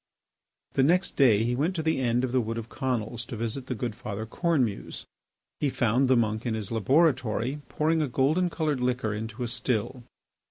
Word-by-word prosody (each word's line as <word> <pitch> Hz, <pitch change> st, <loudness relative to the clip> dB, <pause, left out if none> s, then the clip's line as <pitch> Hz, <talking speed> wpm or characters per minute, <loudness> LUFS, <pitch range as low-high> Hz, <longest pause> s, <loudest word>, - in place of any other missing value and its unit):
The -, -, +2 dB
next 175 Hz, +7 st, +2 dB
day 115 Hz, -6 st, +5 dB
he 120 Hz, +1 st, 0 dB
went 160 Hz, +8 st, 0 dB
to 160 Hz, -, -2 dB
the 160 Hz, -3 st, +1 dB
end 120 Hz, -1 st, +1 dB
of 130 Hz, -, -1 dB
the 130 Hz, 0 st, +2 dB
Wood 115 Hz, 0 st, -3 dB
of 115 Hz, 0 st, -6 dB
Conils 120 Hz, -3 st, -2 dB
to -, -, -6 dB
visit 115 Hz, +4 st, -3 dB
the 125 Hz, -, -2 dB
good 120 Hz, -1 st, -3 dB
Father 110 Hz, 0 st, -5 dB
Cornemuse. 130 Hz, -, -1 dB, 0.5 s
He 145 Hz, -, +1 dB
found 125 Hz, +1 st, +2 dB
the 130 Hz, -1 st, +4 dB
monk 110 Hz, -1 st, 0 dB
in 115 Hz, -3 st, -1 dB
his 110 Hz, -2 st, -4 dB
laboratory 130 Hz, +1 st, +1 dB
pouring 155 Hz, +3 st, +1 dB
a 150 Hz, -, +1 dB
golden 150 Hz, +8 st, +2 dB
coloured 155 Hz, -5 st, -1 dB
liquor 125 Hz, -3 st, 0 dB
into 110 Hz, +3 st, -5 dB
a -, -, -2 dB
still. 120 Hz, +1 st, -1 dB
125 Hz, 195 wpm, -27 LUFS, 115-140 Hz, 0.5 s, day